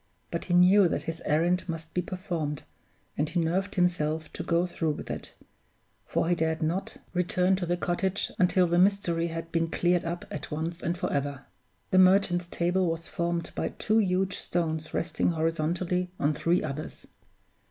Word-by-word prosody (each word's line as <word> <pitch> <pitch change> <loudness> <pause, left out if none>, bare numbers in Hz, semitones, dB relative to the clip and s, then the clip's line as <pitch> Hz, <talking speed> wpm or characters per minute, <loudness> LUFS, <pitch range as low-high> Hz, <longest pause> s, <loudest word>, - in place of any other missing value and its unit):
But - - -3
he 175 - +1
knew 185 +2 +7
that - - -2
his 165 0 -5
errand 175 +4 +1
must 165 -1 -5
be 180 - +1
performed, 170 -5 -4 0.5
and 150 +1 0
he 175 - 0
nerved 185 +4 0
himself 160 -4 0
to - - -5
go 170 +1 +1
through 165 -3 -1
with - - -7
it; - - -6 0.7
for - - 0
he 175 - +3
dared 160 -1 0
not 170 +5 -2 0.2
return 180 +1 +2
to 180 -2 -3
the 175 +1 +1
cottage 185 +3 -1
until 180 0 +4
the 175 0 +2
mystery 180 -3 +2
had 165 0 -6
been 165 -1 +1
cleared 175 +1 +2
up 170 +1 -4
at 150 - -5
once 165 +3 -3
and 170 +1 -1
forever. 140 -4 -2 0.5
The 185 - +5
Merchant's 185 -2 +4
Table 175 +2 +1
was 165 0 -3
formed 170 0 -2
by - - -2
two 220 +1 +2
huge 190 -2 +1
stones 160 -2 -2
resting 165 -1 0
horizontally 165 +3 0
on 145 +2 +2
three 170 +4 +1
others. 150 0 -6
175 Hz, 175 wpm, -28 LUFS, 160-180 Hz, 0.7 s, knew